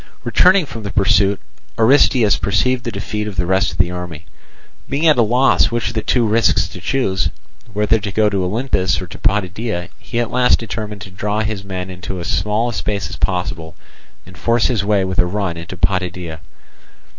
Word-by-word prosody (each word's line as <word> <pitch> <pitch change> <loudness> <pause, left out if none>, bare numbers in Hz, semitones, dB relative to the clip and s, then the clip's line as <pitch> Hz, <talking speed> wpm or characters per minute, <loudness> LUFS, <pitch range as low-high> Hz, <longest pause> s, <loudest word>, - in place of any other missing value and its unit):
Returning 180 - +4
from 115 -5 -8
the 100 - -5
pursuit, 100 0 +3 0.4
Aristeus 120 -2 +4
perceived 125 +6 0
the 120 - -2
defeat 105 -1 -4
of 105 - -6
the 90 -1 0
rest 95 +1 +1
of - - -10
the 85 - +2
army. 90 -3 -7 0.6
Being 145 +4 0
at 155 -5 +5
a - - +7
loss 125 +4 +3
which 120 -1 -1
of - - -7
the 110 - -1
two 120 +2 +1
risks 110 +1 +2
to - - -10
choose, 95 -10 0 0.4
whether 105 +2 +2
to 100 -1 -4
go 110 +1 +2
to 100 -2 0
Olynthus 95 -1 0
or 95 - -5
to 85 - -11
Potidæa, 100 -1 -1
he 120 - -4
at 120 -1 -1
last 125 0 +4
determined 105 -2 -6
to 95 -1 -9
draw 105 +3 -2
his 110 -2 -3
men 95 -1 -5
into 90 +1 -6
as 85 - -5
small 105 +3 0
a - - -4
space 105 -2 -3
as - - -5
possible, 85 -3 -2 0.5
and 90 0 -14
force 115 +5 +2
his 115 -6 0
way 100 -2 +2
with 95 +1 -3
a 90 - +4
run 95 -2 -2
into 85 0 -8
Potidæa. 90 -3 -1
105 Hz, 200 wpm, -18 LUFS, 95-115 Hz, 0.6 s, a